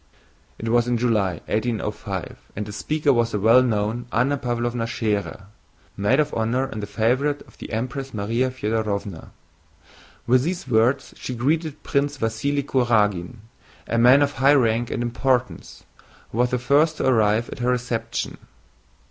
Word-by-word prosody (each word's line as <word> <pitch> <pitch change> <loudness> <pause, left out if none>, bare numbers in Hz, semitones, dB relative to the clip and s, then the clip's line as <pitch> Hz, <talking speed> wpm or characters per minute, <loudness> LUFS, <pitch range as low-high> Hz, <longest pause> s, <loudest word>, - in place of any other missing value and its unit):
It 115 - -6
was 120 +1 +3
in 120 -1 +1
July, 105 -8 0
1805, 110 +1 -3
and 105 - -3
the 105 - -8
speaker 145 +7 +1
was 115 -1 +1
the 105 - 0
well 115 +5 +6
known 115 0 -1
Anna 125 +5 +2
Pávlovna 120 -2 -2
Schérer, 105 -5 -2 0.5
maid 105 +8 +2
of 150 - +1
honor 115 +4 0
and 105 -5 -6
favorite 130 +7 0
of - - -22
the - - -8
Empress 125 +4 -3
Márya 115 +3 -1
Fëdorovna. 105 -6 -3 1.0
With 125 +1 +4
these 175 +2 -3
words 125 +3 +2
she 125 - -5
greeted 150 +4 -1
Prince 145 0 0
Vasíli 135 +5 -1
Kurágin, 110 -5 +1 0.4
a 115 - 0
man 130 +4 +6
of 145 - 0
high 140 +1 +4
rank 115 -2 +2
and 120 - -2
importance, 125 +1 -1 0.5
who 115 - -4
was 125 0 +3
the 125 - 0
first 150 +6 +2
to - - -1
arrive 110 -2 +2
at - - -8
her 120 +1 0
reception. 125 -2 -2
120 Hz, 155 wpm, -23 LUFS, 110-130 Hz, 1.0 s, well